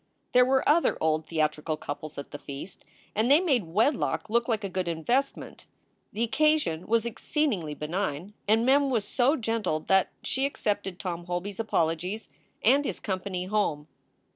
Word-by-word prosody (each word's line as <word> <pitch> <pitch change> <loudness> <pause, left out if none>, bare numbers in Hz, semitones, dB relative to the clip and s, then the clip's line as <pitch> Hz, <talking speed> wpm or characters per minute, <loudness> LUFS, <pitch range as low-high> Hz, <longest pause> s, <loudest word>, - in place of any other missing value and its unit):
There 250 - +6
were 265 +1 +2
other 325 +3 +4
old 155 0 +1
theatrical 155 -1 -1
couples 150 +1 -7
at 140 - -7
the 145 - -7
feast, 140 +6 -9 0.3
and 220 +4 +1
they 290 +3 +7
made 275 - +1
wedlock 220 - 0
look 235 +1 +2
like 220 -3 0
a - - -1
good 185 -1 -3
investment. 235 - -2 0.4
The 230 +2 -1
occa 305 +6 +4
sion 165 - -4
was 230 +1 +2
exceedingly 225 - -1
benign, 170 +3 -3
and 220 +2 +4
Mem 275 +2 +4
was 225 -6 0
so 255 +7 +2
gentled 220 - -2
that 190 -1 +4
she 270 +1 0
accepted 200 -8 -2
Tom 175 -3 -4
Holby 180 +3 -3
s 195 - -14
apologies 180 0 -1 0.3
and 275 +5 +5
his - - -3
company 185 -2 -3
home. 185 -7 0
205 Hz, 165 wpm, -28 LUFS, 165-245 Hz, 0.4 s, they